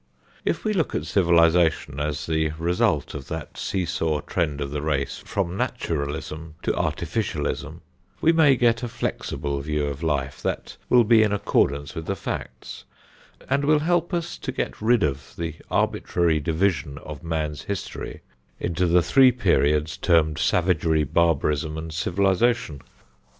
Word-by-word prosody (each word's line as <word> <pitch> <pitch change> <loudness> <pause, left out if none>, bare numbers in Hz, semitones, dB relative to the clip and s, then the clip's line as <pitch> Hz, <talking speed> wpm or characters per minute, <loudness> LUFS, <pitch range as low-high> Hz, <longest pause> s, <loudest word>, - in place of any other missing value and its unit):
If - - -1
we 215 - +1
look 170 -6 0
at - - -2
civilization 85 -5 +3
as 75 0 -2
the 80 -1 0
result 85 +2 +1
of 70 -2 -7
that 80 -4 -6
seesaw 80 -5 -1
trend 75 -3 -2
of 70 -1 -3
the 75 0 -3
race 70 -3 -1
from 95 -3 -2
"Naturalism 80 -1 -3
to - - +1
Artificialism," 80 -1 -2 0.4
we 165 - +4
may 160 -5 +5
get 120 -2 +2
a 120 - -2
flexible 70 -10 -3
view 75 0 -1
of 70 0 -4
life 70 -4 -1
that - - -3
will 125 -1 +6
be 115 0 +5
in 110 -2 +3
accordance 70 -8 +1
with 80 -1 -6
the 100 - -1
facts, - - -6 0.6
and 140 +1 +1
will 150 +2 +4
help 175 +2 +1
us 170 -1 -3
to - - -4
get - - -4
rid 115 +1 +3
of 70 -2 -3
the 85 -2 -3 0.2
arbitrary 85 -3 +1
division 80 -3 0
of 75 -2 -8
man's 80 -3 -2
history 100 -2 -5 0.4
into 90 +1 0
the 85 +1 +4
three 130 +5 +6
periods 80 -8 +1
termed 80 -3 +2
Savagery, 85 -3 +2
Barbarism 75 0 +1
and 80 0 -6
Civilization. 95 - +1
80 Hz, 150 wpm, -24 LUFS, 75-100 Hz, 0.6 s, will